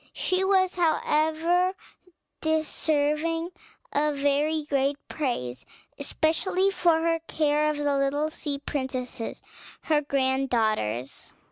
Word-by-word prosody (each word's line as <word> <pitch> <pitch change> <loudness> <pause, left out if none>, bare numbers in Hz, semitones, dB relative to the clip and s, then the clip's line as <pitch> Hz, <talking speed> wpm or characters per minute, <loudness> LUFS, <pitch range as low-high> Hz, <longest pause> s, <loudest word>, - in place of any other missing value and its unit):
She 370 +1 0
was, 380 -1 +2
however, 330 +2 +2 0.7
deserving 315 +1 0 0.4
of 300 0 +1
very 290 +3 +1
great 280 -1 0
praise, 130 - -3 0.4
especially 360 +6 +1
for 340 -4 +3
her 330 0 +1
care 300 0 +2
of 300 - -1
the 290 -1 +1
little 285 +3 0
sea 290 -2 -2
princesses, 260 -4 -4 0.4
her 305 -2 +2
grand 270 -1 0
daughters. 140 - -1
300 Hz, 105 wpm, -26 LUFS, 275-325 Hz, 0.7 s, for